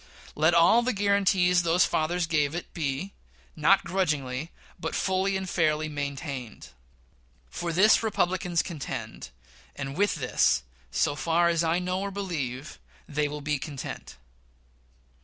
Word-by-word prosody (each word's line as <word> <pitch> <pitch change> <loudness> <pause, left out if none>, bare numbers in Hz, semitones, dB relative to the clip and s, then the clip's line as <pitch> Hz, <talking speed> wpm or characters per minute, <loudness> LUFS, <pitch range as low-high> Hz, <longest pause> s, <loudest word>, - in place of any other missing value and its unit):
Let 160 +3 +3
all 170 +8 +6
the 255 +1 0
guaranties 195 -3 +3
those 170 +1 +3
fathers 170 +2 0
gave 155 -2 0
it 175 - -6
be 155 +5 -3 0.4
not - - +4
grudgingly, 155 -6 -1 0.3
but - - -3
fully 190 +1 +1
and 190 0 -5
fairly 155 -3 +1
maintained. 140 -4 -5 0.8
For 170 - -3
this 190 +6 +5
Republicans 180 -5 0
contend, 160 -7 -6 0.5
and 135 -1 -5
with 205 +2 +2
this, 125 - +2 0.3
so 145 - +1
far 165 +3 +2
as 170 -1 +1
I 165 +1 +2
know 180 +1 -1
or 200 - -2
believe, 150 -9 -5 0.3
they 150 0 0
will 150 0 -6
be 150 0 -1
content. 140 -1 -7
165 Hz, 135 wpm, -27 LUFS, 145-185 Hz, 0.8 s, all